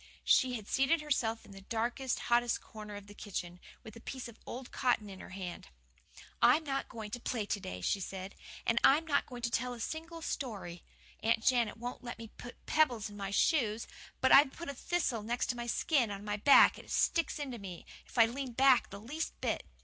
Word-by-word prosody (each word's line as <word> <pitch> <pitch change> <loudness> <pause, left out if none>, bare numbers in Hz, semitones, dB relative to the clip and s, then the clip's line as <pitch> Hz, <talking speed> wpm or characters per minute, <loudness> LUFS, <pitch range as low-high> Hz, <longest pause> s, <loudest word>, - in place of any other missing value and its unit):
She 255 -2 +4
had 215 -3 -7
seated 270 +5 +2
herself 235 -7 -1
in - - -14
the 195 0 -11
darkest, 240 +5 -2
hottest 240 0 +2
corner 210 -1 -9
of 205 -1 -8
the 205 - -12
kitchen, 180 -4 -5 0.2
with 220 - -11
a - - -10
piece 255 +2 -6
of 230 -2 -13
old 250 +1 -7
cotton 230 -5 +1
in 190 - -10
her - - -10
hand. 185 -2 -7 0.7
"I - - +7
am 320 - -7
not 275 -2 -2
going 220 -3 -7
to 245 - -4
play 230 -3 -2
to 205 - -1
day," 90 - -6
she 195 - +1
said, 190 0 -6 0.3
"and 230 0 +3
I'm 300 +4 +6
not 285 -3 +1
going 245 -2 -9
to 235 - 0
tell 250 +1 -1
a - - -11
single 325 +5 -5
story. 195 - -4 0.4
Aunt 225 0 +1
Janet 240 -4 +3
won't 245 +2 -6
let 240 -1 -6
me 225 -1 -9
put 245 - -11
pebbles 245 -9 +2
in - - -11
my 195 -1 -4
shoes, 225 - +2 0.4
but 260 - +4
I've 275 -1 +8
put 340 -3 -7
a - - -3
thistle 275 -5 -1
next 240 +3 -1
my 240 0 -5
skin 245 0 +2
on 200 0 -6
my 210 0 -1
back 280 +7 +7
and - - -12
it - - -10
sticks 335 -2 +1
into 265 -5 -5
me 185 -3 -8 0.2
if - - -13
I 230 - +8
lean 255 +2 -4
back 260 0 +5
the 200 - -8
least 295 +10 -5
bit. - - -2
235 Hz, 220 wpm, -33 LUFS, 210-265 Hz, 0.7 s, I've